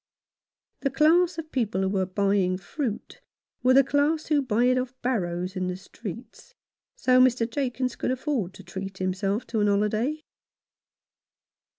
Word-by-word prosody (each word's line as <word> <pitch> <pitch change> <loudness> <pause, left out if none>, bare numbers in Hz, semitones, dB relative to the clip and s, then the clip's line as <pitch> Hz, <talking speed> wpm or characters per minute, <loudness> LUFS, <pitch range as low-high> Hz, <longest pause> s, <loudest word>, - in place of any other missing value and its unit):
The 275 - 0
class 325 +5 +3
of 320 -1 -6
people 220 -7 0
who 190 - +1
were 190 -1 0
buying 195 -1 +1
fruit 220 - -5 0.4
were 255 +1 +4
the 275 - +7
class 290 +3 +1
who 300 -2 +2
buy 240 -3 +1
it 255 0 +3
off 255 0 -5
barrows 185 -6 -1
in 185 -1 -1
the 180 0 -3
streets; 230 - -10 0.4
so 255 0 +4
Mr. 250 -2 +3
Jakins 250 0 -2
could - - -2
afford 255 - -2
to 195 - -12
treat 190 +2 -7
himself 195 +4 -1
to 220 -2 -1
a - - +3
holiday. 215 +9 0
230 Hz, 155 wpm, -26 LUFS, 195-265 Hz, 0.4 s, the